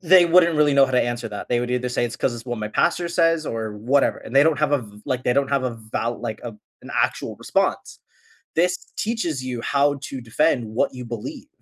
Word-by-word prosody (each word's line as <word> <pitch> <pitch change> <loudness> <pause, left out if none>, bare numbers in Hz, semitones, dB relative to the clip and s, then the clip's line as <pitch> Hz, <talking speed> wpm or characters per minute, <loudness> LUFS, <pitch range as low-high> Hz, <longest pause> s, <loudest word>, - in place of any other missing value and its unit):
They 180 0 +6
wouldn't 170 -1 +5
really 150 -2 +4
know 140 -1 +7
how 130 - -6
to 125 - +4
answer 120 -1 -3
that, 105 - -7
they 120 - +2
would 125 0 -3
either 125 0 -1
say 120 - 0
it's 120 - -4
‘cause 120 - 0
it's 115 0 -9
what 120 -2 -3
my 105 - -3
pastor 170 +9 +1
says 165 -2 +2
or 110 -2 -3
whatever, 135 +6 +2
and 125 - -10
they 140 - +7
don't 160 -2 +2
have 150 -1 +2
a 145 - +4
v 105 -1 -14
like, 130 0 -2
they 125 - +3
don't 140 +1 +1
have 140 -2 0
a 120 -2 -3 0.2
val 120 +1 -2
like 110 -2 -5
a 115 -3 -6 0.3
an - - -10
actual - - -2
response. - - -1 0.6
This 180 +2 +3 0.2
teaches 175 - -2
you 125 -2 -4
how 140 +2 +1
to 135 -2 -6
defend 120 +1 +1
what 110 +3 -1
you 125 -1 -7
believe, 115 -2 -7
130 Hz, 245 wpm, -23 LUFS, 120-150 Hz, 0.6 s, know